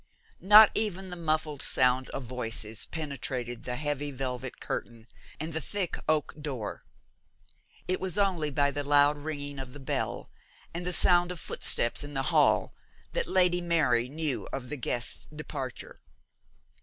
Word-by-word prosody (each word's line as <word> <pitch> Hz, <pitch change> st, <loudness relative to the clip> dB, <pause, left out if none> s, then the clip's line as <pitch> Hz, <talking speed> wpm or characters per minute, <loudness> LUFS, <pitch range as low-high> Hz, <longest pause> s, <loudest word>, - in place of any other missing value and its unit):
Not 210 Hz, +2 st, +9 dB
even 195 Hz, -3 st, -2 dB
the -, -, -4 dB
muffled 155 Hz, -3 st, -1 dB
sound 130 Hz, -1 st, +2 dB
of 135 Hz, -, -5 dB
voices 115 Hz, -3 st, -3 dB
penetrated 130 Hz, -6 st, -4 dB
the 125 Hz, -, -2 dB
heavy 145 Hz, +1 st, -2 dB
velvet 130 Hz, -2 st, -4 dB
curtain 115 Hz, -1 st, -5 dB, 0.3 s
and 160 Hz, +2 st, -4 dB
the 160 Hz, -, -2 dB
thick 195 Hz, +1 st, -1 dB
oak 155 Hz, -2 st, +1 dB
door. 130 Hz, -8 st, -5 dB, 1.0 s
It 185 Hz, -, 0 dB
was 190 Hz, +1 st, -3 dB
only 185 Hz, -7 st, +1 dB
by 140 Hz, 0 st, +2 dB
the 145 Hz, +1 st, -3 dB
loud 145 Hz, +1 st, +5 dB
ringing 145 Hz, -2 st, -4 dB
of 130 Hz, -1 st, -7 dB
the 145 Hz, -, -9 dB
bell 135 Hz, -, -3 dB, 0.4 s
and 175 Hz, +1 st, -4 dB
the -, -, +1 dB
sound 175 Hz, 0 st, +4 dB
of 180 Hz, -, -6 dB
footsteps 120 Hz, -2 st, +1 dB
in 145 Hz, 0 st, -8 dB
the 135 Hz, -, 0 dB
hall -, -, +3 dB, 0.4 s
that -, -, -1 dB
Lady 180 Hz, -1 st, +3 dB
Mary 145 Hz, -9 st, +2 dB
knew 155 Hz, -2 st, -1 dB
of 125 Hz, -2 st, -5 dB
the 150 Hz, -, -3 dB
guest's 120 Hz, -1 st, -2 dB
departure. 145 Hz, -4 st, -7 dB
145 Hz, 155 wpm, -29 LUFS, 130-170 Hz, 1.0 s, Not